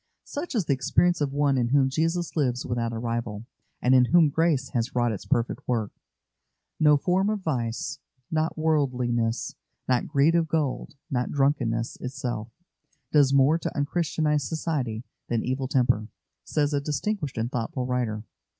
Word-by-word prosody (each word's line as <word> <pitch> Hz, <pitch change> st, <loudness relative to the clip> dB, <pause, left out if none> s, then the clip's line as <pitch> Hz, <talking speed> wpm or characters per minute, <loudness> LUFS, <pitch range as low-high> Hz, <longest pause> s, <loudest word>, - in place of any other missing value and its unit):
Such 290 Hz, 0 st, -5 dB
is 205 Hz, -7 st, +1 dB
the 145 Hz, -, +2 dB
experience 155 Hz, +6 st, +2 dB
of 140 Hz, -2 st, 0 dB
one 140 Hz, -1 st, +2 dB
in 120 Hz, -, +1 dB
whom 135 Hz, +1 st, +3 dB
Jesus 165 Hz, +4 st, -1 dB
lives 125 Hz, -5 st, 0 dB
without 120 Hz, -1 st, -1 dB
a 115 Hz, -, -4 dB
rival, 115 Hz, -2 st, -3 dB, 0.4 s
and 125 Hz, -, +4 dB
in 125 Hz, -1 st, +6 dB
whom 165 Hz, +2 st, +5 dB
grace 150 Hz, -3 st, +1 dB
has 120 Hz, -1 st, -2 dB
wrought 120 Hz, -1 st, +2 dB
its 105 Hz, -, -6 dB
perfect 120 Hz, -5 st, 0 dB
work. 115 Hz, -4 st, 0 dB, 0.9 s
"No 150 Hz, -1 st, +6 dB
form 185 Hz, +6 st, +1 dB
of 215 Hz, -2 st, -1 dB
vice, 125 Hz, -4 st, -2 dB, 0.3 s
not 160 Hz, +1 st, 0 dB
worldliness, 125 Hz, -7 st, 0 dB, 0.3 s
not 125 Hz, -2 st, +1 dB
greed 145 Hz, +4 st, +3 dB
of 170 Hz, -1 st, +2 dB
gold, 150 Hz, -2 st, -2 dB, 0.2 s
not 125 Hz, -2 st, -1 dB
drunkenness 135 Hz, -5 st, 0 dB
itself, 125 Hz, -4 st, -4 dB, 0.6 s
does 145 Hz, -3 st, +5 dB
more 140 Hz, +4 st, +4 dB
to -, -, -4 dB
un 145 Hz, -, +2 dB
Christianise 150 Hz, -2 st, 0 dB
society 135 Hz, -9 st, -2 dB, 0.2 s
than 115 Hz, -2 st, -1 dB
evil 130 Hz, +1 st, -1 dB
temper," 125 Hz, -5 st, +2 dB, 0.4 s
says 150 Hz, -1 st, 0 dB
a 140 Hz, -, +1 dB
distinguished 150 Hz, -, -2 dB
and 115 Hz, +2 st, -1 dB
thoughtful 125 Hz, +1 st, -2 dB
writer. 120 Hz, -4 st, -1 dB
135 Hz, 160 wpm, -26 LUFS, 120-155 Hz, 0.9 s, in